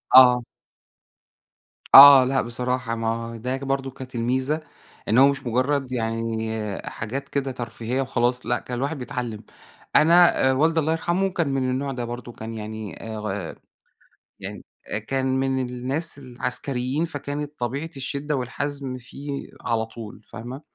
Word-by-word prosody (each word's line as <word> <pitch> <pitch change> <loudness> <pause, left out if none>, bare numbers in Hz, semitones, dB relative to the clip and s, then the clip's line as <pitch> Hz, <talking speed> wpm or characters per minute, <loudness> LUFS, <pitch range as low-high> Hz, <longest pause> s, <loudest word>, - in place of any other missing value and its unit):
آه. 125 -1 +8 1.5
آه. 140 -1 +12
لأ 135 +1 +1
بصراحة 125 0 -2
ما 115 0 -3
هو 115 +1 -3
ده 125 +4 -3
برضه 135 0 -2
كانت 130 0 -10
الميزة، 130 +6 0 0.5
إن 110 - +2
هو 135 +2 +8
مش 140 -1 -1
مُجرّد 130 +2 0
يعني 110 -3 -2
حاجات 135 +6 -5
كده 135 -1 -1
ترفيهية 120 +1 -3
وخلاص 125 -1 0
لأ، 120 +1 0
كان 125 - -6
الواحد 140 +4 -2
بيتعلّم. 120 -4 -5 0.5
أنا 165 -4 +6
والدي 160 +4 +3
الله 155 0 +1
يرحمه 175 +4 0
كان 170 -6 -1
من 135 -1 0
النوع 135 +2 -2
ده 125 -2 -4
برضه. 120 +1 -7
كان 115 -1 -8
يعني 110 -1 -7
أ - - -5
غ 100 -5 -4 0.9
يعني - - -7 0.2
أ - - -1
كان 130 +4 -2
من 130 -1 0
الناس 135 +5 -2
العسكريين 130 +2 -2
فكانت 145 -1 -5
طبيعة 135 +7 -3
الشِدّة 140 +2 -2
والحَزم 135 +1 -3
فيه 140 +3 -7
على 115 -2 0
طول 110 -2 -10
فاهمة؟ 125 +6 -8
130 Hz, 145 wpm, -24 LUFS, 115-140 Hz, 1.5 s, آه